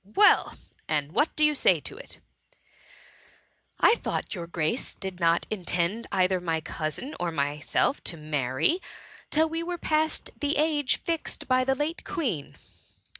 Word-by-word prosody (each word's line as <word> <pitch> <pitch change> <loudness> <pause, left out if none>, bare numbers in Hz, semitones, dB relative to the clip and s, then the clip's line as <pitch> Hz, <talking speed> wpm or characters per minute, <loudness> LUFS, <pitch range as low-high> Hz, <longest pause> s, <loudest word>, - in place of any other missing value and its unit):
"Well, 415 - +5 0.3
and 150 -1 -1
what 295 - +1
do 305 - +4
you 300 - +4
say 290 - +3
to - - -8
it - - -9 0.5
?" - - -26 0.2
" - - -39 0.3
I - - +7
thought - - -3
your 170 -4 -5
Grace 170 +7 -2
did 190 -2 -6
not 170 0 +3
intend 185 +2 -1
either 185 -1 +2
my 165 -2 0
cousin, 155 - -4
or 175 -1 -1
myself 150 - 0
to 170 - -3
marry, 150 - 0 0.5
till 315 +1 +3
we 325 +1 -2
were 350 +1 -3
past 315 -1 0
the 290 0 0
age 295 -3 +2
fixed 330 -2 -3
by 255 0 +3
the 265 +1 +1
late 300 +4 -2
Queen 240 - -3
200 Hz, 160 wpm, -27 LUFS, -, 0.5 s, I